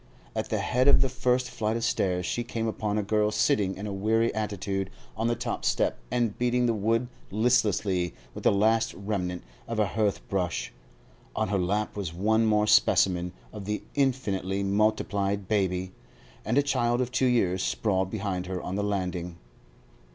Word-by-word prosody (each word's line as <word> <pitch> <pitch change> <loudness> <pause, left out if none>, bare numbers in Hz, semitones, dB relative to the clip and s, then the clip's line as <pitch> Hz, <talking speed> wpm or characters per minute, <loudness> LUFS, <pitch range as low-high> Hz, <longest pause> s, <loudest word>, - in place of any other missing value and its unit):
At - - -2
the - - 0
head 125 +2 +1
of - - +6
the 135 - +2
first 125 0 +1
flight 110 +1 -1
of 115 - -4
stairs 90 -6 0
she 120 - -1
came 115 -1 -3
upon 105 -1 -1
a 105 - +1
girl 105 +1 +2
sitting 105 -2 +1
in 100 - -6
a 100 - -3
weary 110 +4 +1
attitude 100 -2 -2 0.3
on 115 - 0
the 120 - +1
top - - -4
step - - +1
and 120 -4 0
beating 125 0 +2
the 115 - +2
wood 115 +3 +1 0.2
listlessly 105 -5 +1 0.2
with - - -8
the - - +5
last 110 +3 +2
remnant 95 -3 -3 0.2
of 115 - -3
a 105 - +3
hearth 105 -1 -1
brush; 90 -11 -2 0.6
on - - 0
her 100 -1 +1
lap 100 +4 -1
was 95 -5 -4
one 110 +4 +2
more 105 -1 +3
specimen 90 -4 +3 0.2
of 100 - -7
the 105 +1 -3
infinitely 100 -8 0
multiplied 100 -1 0
baby, 95 -3 0 0.5
and 115 +5 0
a 145 - +5
child 120 -3 +1
of 125 -1 -1
two 130 0 +2
years 95 -7 +2
sprawled 95 -3 0
behind 95 -3 -3
her 95 -1 -3
on 90 - -5
the 100 +1 -1
landing. 90 -4 -2
105 Hz, 180 wpm, -27 LUFS, 95-115 Hz, 0.6 s, of